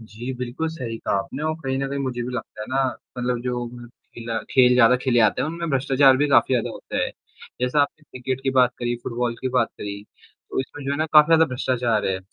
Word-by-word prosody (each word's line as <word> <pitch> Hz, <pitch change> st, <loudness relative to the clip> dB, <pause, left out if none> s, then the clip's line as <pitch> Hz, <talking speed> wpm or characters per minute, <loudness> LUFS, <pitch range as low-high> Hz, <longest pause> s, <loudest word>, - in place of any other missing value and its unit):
जी, 115 Hz, +3 st, -7 dB
बिल्कुल 125 Hz, +6 st, -3 dB
सही 125 Hz, -8 st, -5 dB
कहा -, -, -2 dB
आपने 130 Hz, +9 st, -5 dB
और 155 Hz, 0 st, 0 dB
कहीं 130 Hz, 0 st, -1 dB
न 135 Hz, 0 st, -2 dB
कहीं 140 Hz, +1 st, -3 dB
मुझे 130 Hz, -3 st, -3 dB
भी 120 Hz, -, -4 dB
लगता 115 Hz, -3 st, -6 dB
है -, -, -7 dB
ना 135 Hz, +1 st, +1 dB, 0.3 s
मतलब 125 Hz, -1 st, -1 dB
जो 125 Hz, -1 st, -2 dB, 0.5 s
खेला 115 Hz, -1 st, -4 dB
खेल 125 Hz, -2 st, +5 dB
ज़्यादा 125 Hz, 0 st, +6 dB
खेले 125 Hz, -3 st, +2 dB
जाते 110 Hz, -2 st, +3 dB
हैं -, -, -1 dB
उनमें 170 Hz, +1 st, -4 dB
भ्रष्टाचार 135 Hz, 0 st, +4 dB
भी 145 Hz, +2 st, +2 dB
काफ़ी 130 Hz, -1 st, +4 dB
ज़्यादा 120 Hz, -, 0 dB
होता -, -, -7 dB
है। -, -, -1 dB, 0.5 s
जैसा 125 Hz, +4 st, +2 dB
आपने 145 Hz, +2 st, -1 dB
क्रिकेट 130 Hz, +1 st, -4 dB
की 135 Hz, -, +1 dB
बात 130 Hz, -2 st, +4 dB
करी, 120 Hz, 0 st, -1 dB
फुटबॉल 120 Hz, 0 st, -2 dB
की 130 Hz, -, -1 dB
बात 125 Hz, -2 st, +1 dB
करी, 100 Hz, 0 st, -6 dB, 0.5 s
तो -, -, 0 dB
इसमें 140 Hz, +2 st, -8 dB
जो 135 Hz, -, -2 dB
है -, -, -1 dB
ना 155 Hz, -, +1 dB
काफ़ी 150 Hz, -1 st, +8 dB
ज़्यादा 165 Hz, 0 st, +5 dB
भ्रष्टाचार 125 Hz, -4 st, 0 dB
है। 95 Hz, -1 st, 0 dB
125 Hz, 235 wpm, -23 LUFS, 120-135 Hz, 0.5 s, काफ़ी